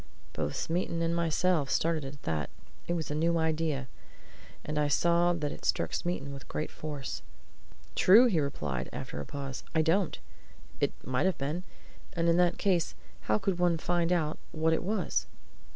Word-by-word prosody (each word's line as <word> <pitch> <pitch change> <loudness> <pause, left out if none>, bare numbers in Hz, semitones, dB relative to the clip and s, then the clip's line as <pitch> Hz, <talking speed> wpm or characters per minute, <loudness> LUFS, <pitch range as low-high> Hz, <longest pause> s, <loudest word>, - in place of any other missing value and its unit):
Both 75 -1 -2
Smeaton 170 0 -1
and 165 0 +1
myself 170 -2 +2
started 160 0 +1
at 140 +1 -9
that 75 -2 -1 0.4
it 175 - 0
was 160 -4 -2
a - - 0
new 165 +2 +2
idea. 160 -4 0 0.8
And 150 0 -1
I 150 - +3
saw 170 +4 +3
that 155 -4 -1
it - - -9
struck - - 0
Smeaton 140 -5 -2
with 135 - -9
great 155 - -3
force. 145 -3 -5 0.7
"True!" 215 +7 +7
he 200 -10 +3
replied, 75 - -2
after 75 - -5
a - - -7
pause. 135 -2 -5
"I 160 - +4
don't! 170 +3 +2 0.6
It - - +2
might 130 +8 +1
have 190 - 0
been. 150 +6 -2 0.5
And 170 -1 +1
in 170 0 +4
that 180 -1 +3
case 180 -5 +1 0.3
how - - +5
could 195 -3 -1
one 175 -2 +3
find 175 +1 +1
out 160 -4 +1
what 160 0 +2
it - - +1
was?" 195 -1 -1
160 Hz, 175 wpm, -30 LUFS, 145-175 Hz, 0.8 s, True